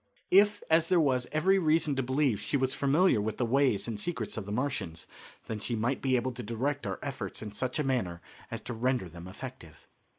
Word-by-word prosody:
If, 205 +2 +5
as 160 0 +4
there 180 -1 +4
was 130 -5 +2
every 190 +5 +3
reason 155 -3 +2
to 135 - +1
believe, 130 -3 +1
she 145 - -1
was 130 0 0
familiar 140 - +3
with 110 +1 -3
the 125 - +1
ways 125 -4 +2
and 110 -3 -3
secrets 125 -6 -3
of 105 -3 -5
the - - -4
Martians, 105 - -2 0.4
then 110 - -4
she 120 +3 -3
might 120 +4 -1
be 130 -1 +2
able 125 +1 0
to 125 0 -7
direct 120 +3 -2
our 95 - -3
efforts - - -4
in 105 - -6
such 125 +4 -2
a 150 - +1
manner 115 -11 -1 0.3
as - - -5
to 120 - -5
render 125 -3 0
them 85 +1 -10
effective. 100 - -10
130 Hz, 220 wpm, -30 LUFS, 110-145 Hz, 0.4 s, If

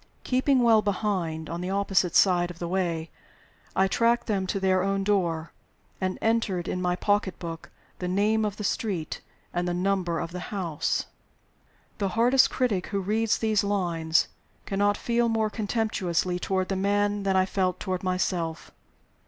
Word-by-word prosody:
Keeping 260 0 +2
well 225 -2 +6
behind, 185 -6 -1
on 170 +1 -4
the 180 - -3
opposite 195 -3 +1
side 175 -2 +4
of 175 - -9
the 170 - -4
way, 170 -3 -1 0.6
I 190 - +4
tracked 230 +4 +2
them 195 -4 -1
to 195 - -1
their 190 -1 +2
own 195 +1 0
door, 170 -5 0 0.5
and 185 0 -1
entered 215 -6 +1
in 180 - -2
my 180 0 +1
pocket 205 0 0
book 165 -1 -7 0.3
the 180 - -3
name 210 +4 +2
of 210 -1 -2
the 210 - -5
street 195 -7 -2 0.3
and 175 0 -1
the 175 - -1
number 180 -2 0
of 165 - -4
the 180 - -5
house. 170 -6 -1 0.9
The 200 -2 0
hardest 250 +3 +5
critic 220 -8 0
who 200 - -2
reads 215 +3 +1
these 215 -2 +1
lines 170 -5 +1 0.4
cannot 205 +1 +1
feel 235 0 +1
more 220 -1 +1
contemptuously 195 -6 -1
toward 190 +1 -1
me 190 - -2 0.4
than 195 -1 +1
I 185 0 +4
felt 185 -1 -1
toward 185 -2 -2
myself. 180 -3 -2
190 Hz, 160 wpm, -26 LUFS, 180-210 Hz, 0.9 s, well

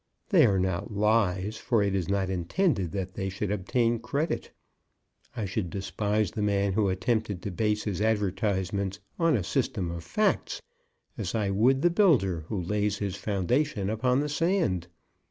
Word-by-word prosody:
They - - +6
are 100 - +2
not 95 +3 -1
lies; 105 -1 +1
for 115 -4 +1
it 100 -1 0
is 95 -3 -1
not 95 -1 0
intended 95 - 0
that 95 -2 -3
they 95 +1 -3
should 100 +1 -3
obtain 115 +4 +1
credit. 140 +7 -2 0.9
I 110 -4 -2
should 95 -1 -2
despise 100 +2 -1
the 105 - -4
man 100 -1 +1
who 100 -1 +2
attempted 100 +1 -1
to 100 - -3
base 105 +2 0
his 105 -2 -3
advertisements 100 -2 0 0.2
on 165 -5 +3
a 100 - -2
system 85 0 -1
of 85 -1 -6
facts, - - 0 0.6
as 90 - -3
I 105 -3 0
would 125 +7 +3
the 175 - +5
builder 120 - +3
who 105 - -2
lays 105 +3 0
his 100 -2 -3
foundation 105 - 0
upon 125 +4 +1
the 150 - -2
sand. 150 - +1
100 Hz, 165 wpm, -28 LUFS, 95-115 Hz, 0.9 s, They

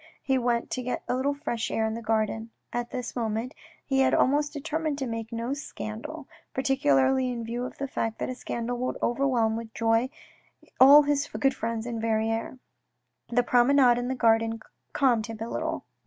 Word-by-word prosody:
He 265 -1 +2
went 235 -1 0
to 255 - -2
get 250 0 -3
a - - 0
little 280 +2 0
fresh 240 -6 -3
air 220 - 0
in 220 - -1
the 230 - -5
garden. 220 0 -1 0.2
At 240 0 -2
this 250 -2 -5
moment 230 +2 -2 0.3
he 270 -1 +1
had 265 - +4
almost 290 +2 +2
determined 310 0 -2
to 270 - -2
make 225 -1 -5
no 230 +3 -2
scandal, 285 +2 -7 0.3
particularly 260 - +2
in 240 -2 -4
view 240 +2 -3
of - - -8
the 275 - -3
fact 225 -4 -2
that - - -3
a 255 - -3
scandal 240 -1 -4
would 255 - -2
overwhelm 240 -3 +1
with 225 -1 -7
joy 225 +2 +2 0.7
all 285 +3 +9
his 285 0 0
good 270 -1 +1
friends 230 0 -3
in 235 -2 -4
Verrieres. 225 +2 -1 0.7
The 245 +1 +2
promenade 245 0 +4
in 245 - -3
the 260 - -1
garden 225 -1 +2 0.3
calmed 240 -5 +2
him 225 -1 -6
a 225 - -4
little. - - -3
240 Hz, 185 wpm, -27 LUFS, 225-270 Hz, 0.7 s, all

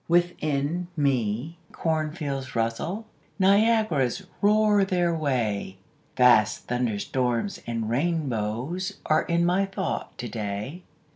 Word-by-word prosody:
Within 170 -1 +1
me 135 +2 0
cornfields 150 -5 -2
rustle, 115 - -1 0.3
Niagaras 200 - +3 0.2
roar 210 0 +4
their 180 -3 +1
way, 115 -11 -1 0.4
Vast 120 -4 +5
thunderstorms 125 - -1
and 115 -2 -2
rainbows 135 - -1
Are 155 +1 +3
in 170 0 +1
my 185 +3 +2
thought 195 -2 -4
to 120 - -4
day. 105 - -4
150 Hz, 95 wpm, -26 LUFS, 120-175 Hz, 0.4 s, Vast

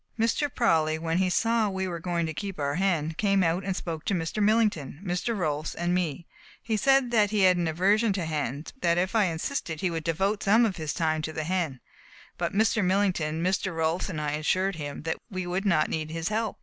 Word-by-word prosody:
Mr. 230 +6 +1
Prawley, 160 -11 +2
when 165 +2 -1
he 185 -1 +2
saw 225 +3 +2
we 190 -1 -2
were 170 -2 -4
going 170 0 -1
to 160 - -4
keep 195 +3 -5
our 140 -1 0
hen, 165 -3 +1
came 195 -2 +3
out 170 +3 +1
and 190 0 -2
spoke 165 -4 -5
to 200 - 0
Mr. 170 +5 -2
Millington, 205 - +1
Mr. 180 +6 -1
Rolfs, 155 -3 -2
and 175 +1 -1
me. 175 -2 -1 0.4
He 225 - -1
said 270 +1 +3 0.2
he 210 -1 +1
had 185 -1 +6
an 175 -1 0
aversion 200 +7 +2
to 185 -3 -2
hens, 150 -2 -3
but 265 - -32
that 170 -4 +2
if 185 +1 0
I 215 -3 +4
insisted 165 - -3
he 185 - 0
would 165 -1 -3
devote 190 +6 0
some 220 +4 +4
of 200 -5 -2
his 155 -3 -3
time 155 -1 0
to 155 - -4
the 155 - -3
hen, 160 -6 -2 0.6
but - - -1
Mr. 215 +1 +2
Millington, 180 -4 +1
Mr. 185 -1 0
Rolfs, 160 +4 0
and 165 -5 -4
I 150 -1 -1
assured 185 +5 0
him 145 -1 -6 0.3
we 185 -3 -4
would 185 +3 -2
not 160 -5 +3
need 155 -1 -3
his 165 +2 -3
help. 220 0 -2
180 Hz, 220 wpm, -27 LUFS, 160-200 Hz, 0.6 s, had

